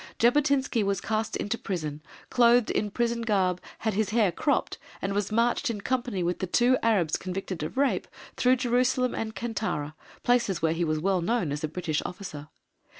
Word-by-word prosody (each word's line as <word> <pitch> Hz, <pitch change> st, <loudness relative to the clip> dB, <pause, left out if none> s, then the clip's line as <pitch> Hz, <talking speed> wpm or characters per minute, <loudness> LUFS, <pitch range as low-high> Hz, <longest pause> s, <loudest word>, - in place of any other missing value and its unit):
Jabotinsky 270 Hz, 0 st, +3 dB
was 200 Hz, 0 st, 0 dB
cast 220 Hz, 0 st, -2 dB
into 230 Hz, +3 st, -2 dB
prison, 155 Hz, -6 st, -4 dB, 0.3 s
clothed 240 Hz, -1 st, +5 dB
in 210 Hz, -, 0 dB
prison 235 Hz, +2 st, -1 dB
garb, 190 Hz, -5 st, +1 dB, 0.2 s
had 220 Hz, -1 st, -1 dB
his 215 Hz, +1 st, 0 dB
hair 215 Hz, -3 st, +3 dB
cropped, 285 Hz, -, 0 dB, 0.2 s
and 195 Hz, +1 st, -2 dB
was 205 Hz, +1 st, -1 dB
marched 240 Hz, +5 st, +2 dB
in 220 Hz, -3 st, -3 dB
company 245 Hz, -6 st, -1 dB
with 175 Hz, +1 st, -1 dB
the 190 Hz, -, -2 dB
two 245 Hz, +7 st, +4 dB
Arabs 195 Hz, -9 st, +2 dB
convicted 185 Hz, -2 st, -5 dB
of 155 Hz, +11 st, -5 dB
rape 280 Hz, 0 st, +1 dB, 0.3 s
through 255 Hz, +1 st, +4 dB
Jerusalem 250 Hz, 0 st, +1 dB
and 220 Hz, -1 st, -4 dB
Kantara, 215 Hz, -10 st, -3 dB, 0.3 s
places 240 Hz, -6 st, +2 dB
where 160 Hz, 0 st, +1 dB
he 170 Hz, +1 st, -1 dB
was 155 Hz, -1 st, 0 dB
well 185 Hz, +3 st, +1 dB
known 180 Hz, -4 st, 0 dB
as 145 Hz, +1 st, -4 dB
a -, -, +1 dB
British 160 Hz, -1 st, -2 dB
officer. 155 Hz, -6 st, -7 dB
210 Hz, 180 wpm, -27 LUFS, 180-240 Hz, 0.3 s, clothed